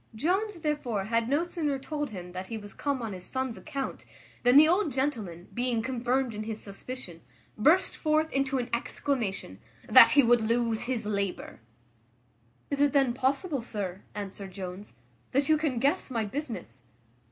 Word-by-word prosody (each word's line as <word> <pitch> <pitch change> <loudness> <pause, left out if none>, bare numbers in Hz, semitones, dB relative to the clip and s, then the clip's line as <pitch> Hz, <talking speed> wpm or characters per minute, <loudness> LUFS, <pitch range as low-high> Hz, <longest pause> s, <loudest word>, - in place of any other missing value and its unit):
Jones 380 - 0
therefore 290 -10 -1
had 230 +3 0
no 290 +4 +2
sooner 320 -5 -2
told 295 +1 -4
him 180 -4 -8
that 185 +1 -6
he 225 - -4
was 205 -2 -10
come 280 -4 -2
on 220 -3 -4
his 180 -1 -7
son's 260 +2 -2
account 275 +7 -5 0.4
than 245 +2 +6
the 305 +1 +9
old 355 -1 +2
gentleman, 225 - -2
being 240 -2 0
confirmed 255 0 0
in 210 - -5
his 220 0 -4
suspicion, 200 -3 -6 0.3
burst 315 - +3
forth 310 0 +1
into 275 0 0
an 245 -2 -2
exclamation, 230 - -2 0.3
"That 255 +4 +10
he 285 - +6
would 240 0 +4
lose 230 0 0
his 240 -3 -2
labour." 200 -3 -3 1.1
"Is 280 0 0
it 290 0 +4
then 270 -4 +3
possible, 275 +3 0
sir," 200 -5 -5
answered 200 -1 -7
Jones, 185 - -7 0.4
"that 275 +2 +2
you 310 - +6
can 300 -5 -1
guess 275 +4 +1
my 230 -4 -1
business?" 200 - -6
245 Hz, 165 wpm, -28 LUFS, 210-280 Hz, 1.1 s, That